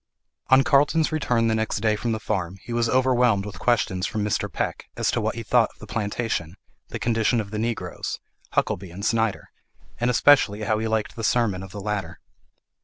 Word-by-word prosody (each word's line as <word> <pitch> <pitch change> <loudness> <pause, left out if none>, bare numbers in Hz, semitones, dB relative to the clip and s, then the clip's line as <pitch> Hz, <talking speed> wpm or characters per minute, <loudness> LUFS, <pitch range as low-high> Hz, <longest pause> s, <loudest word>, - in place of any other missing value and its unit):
ON 130 +1 +6
Carlton's 155 +2 +3
return 120 -7 +1
the 110 - +2
next 110 -1 -1
day 110 0 +2
from 115 +2 -2
the 110 - -1
farm, 95 -3 -3
he 120 - -6
was 115 0 +1
overwhelmed 125 -5 +3
with 105 - -8
questions 100 -6 +1
from 105 - -2
Mr. 105 - -1
Peck, - - -3
as - - +1
to - - 0
what - - -1
he - - -5
thought - - +3
of - - -30
the - - -9
plantation, 105 -5 -3 0.3
the - - -5
condition 115 0 +1
of 105 -2 -5
the 105 - -3
Negroes, 110 -6 -3 0.3
Huckelby 95 0 0
and 95 +4 -7
Snyder; 115 -3 0 0.5
and 120 +1 +1
especially 120 -4 +4
how 105 +1 +1
he 110 - -1
liked 110 -1 -1
the 115 - -6
sermon 110 -5 +1
of 95 -1 -9
the 105 - -7
latter. 95 -5 -3
110 Hz, 200 wpm, -24 LUFS, 100-120 Hz, 0.5 s, ON